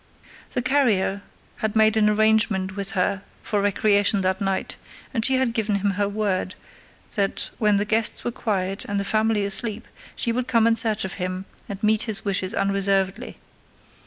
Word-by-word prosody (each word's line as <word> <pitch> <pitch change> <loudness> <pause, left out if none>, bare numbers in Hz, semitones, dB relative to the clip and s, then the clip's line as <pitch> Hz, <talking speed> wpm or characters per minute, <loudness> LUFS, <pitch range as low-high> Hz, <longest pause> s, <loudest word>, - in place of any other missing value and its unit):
The 245 - -1
carrier 215 -8 +1 0.4
had 220 -2 -2
made 220 0 +4
an 215 -1 +4
arrangement 215 -3 +2
with 200 +1 -3
her 185 +1 0 0.2
for 205 -2 -1
recreation 205 0 +3
that 185 +1 0
night, 195 -1 -2 0.4
and 225 -3 -1
she 265 +3 +3
had 260 -3 +1
given 215 -3 0
him 200 0 0
her 200 +1 -1
word 200 -3 -2 0.6
that 200 -2 -1
when 210 -2 +3
the 205 - +1
guests 220 +1 +1
were 240 - -2
quiet 195 -4 -2
and 205 -1 -2
the 200 - -2
family 215 -1 +1
asleep 210 +2 -2 0.3
she 235 - -1
would 250 +2 -2
come 230 -2 +3
in 230 0 +4
search 220 -3 +1
of 190 - -5
him 185 +1 -3 0.2
and 200 0 -7
meet 215 0 +3
his 215 - -1
wishes 190 0 -1
unreservedly. 195 +2 0
205 Hz, 175 wpm, -23 LUFS, 195-220 Hz, 0.6 s, made